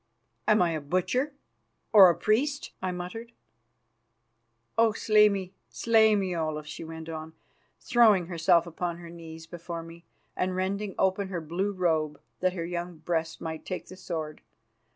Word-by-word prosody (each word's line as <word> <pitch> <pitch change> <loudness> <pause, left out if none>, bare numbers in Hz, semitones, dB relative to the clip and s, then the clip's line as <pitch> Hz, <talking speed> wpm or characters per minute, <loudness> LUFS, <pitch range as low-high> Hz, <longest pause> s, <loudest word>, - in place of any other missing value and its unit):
"Am 215 -3 +5
I 170 - +1
a 155 -2 -2
butcher 185 - 0 0.6
or 195 -4 +10
a 170 - +1
priest?" 275 +7 0
I 185 -1 -1
muttered. 205 +7 -7 1.4
"Oh, 225 -1 +4
slay 210 0 +5
me, 190 -2 -3 0.2
slay 220 -2 +4
me, 190 -3 -1
Olaf!" 155 -2 -2
she 150 - -7
went 160 0 -8
on, 160 0 -6 0.5
throwing 215 -7 +4
herself 170 0 +3
upon 170 0 -4
her 170 -1 -10
knees 165 -1 -10
before 170 0 -7
me, 165 +1 -12 0.3
and 185 0 -1
rending 195 +2 -2
open 190 +1 +1
her 185 -2 -3
blue 175 +6 -2
robe 160 -6 0 0.2
that 185 0 +1
her 170 -3 -3
young 175 0 -4
breast 160 0 -2
might 160 -1 -5
take 185 - -6
the 185 - -9
sword. 160 -5 -5
180 Hz, 155 wpm, -28 LUFS, 165-200 Hz, 1.4 s, or